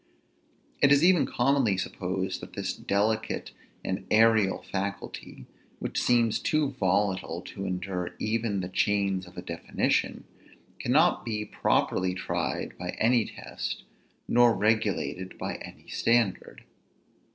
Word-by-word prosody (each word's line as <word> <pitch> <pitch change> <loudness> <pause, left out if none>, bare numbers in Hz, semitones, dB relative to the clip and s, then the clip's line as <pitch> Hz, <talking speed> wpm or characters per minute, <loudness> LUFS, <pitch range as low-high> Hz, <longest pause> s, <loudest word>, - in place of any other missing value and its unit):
It 140 - +6
is 140 +2 +6
even 180 -1 +5
commonly 125 -5 +2
supposed 95 - -3
that - - -10
this - - -2
delicate 105 +2 -1 0.3
and 95 +1 -3
aerial 110 -3 +4
faculty, 100 +1 -5 0.3
which - - -2
seems 115 -2 +3
too 155 -3 +1
volatile 95 -5 0
to 95 - -7
endure 90 -1 -3
even 110 -2 -1
the 90 - -4
chains 95 -1 0
of 90 - -16
a - - -5
definition, - - -1 0.6
cannot 155 +8 +3
be 105 -2 -3
properly 90 -3 +1
tried 95 - -3
by 90 0 -4
any 115 0 +3
test, - - -6 0.4
nor 120 -1 +5
regulated 105 -3 0
by - - -4
any - - -12
standard. 115 -4 0
105 Hz, 120 wpm, -28 LUFS, 95-120 Hz, 0.6 s, It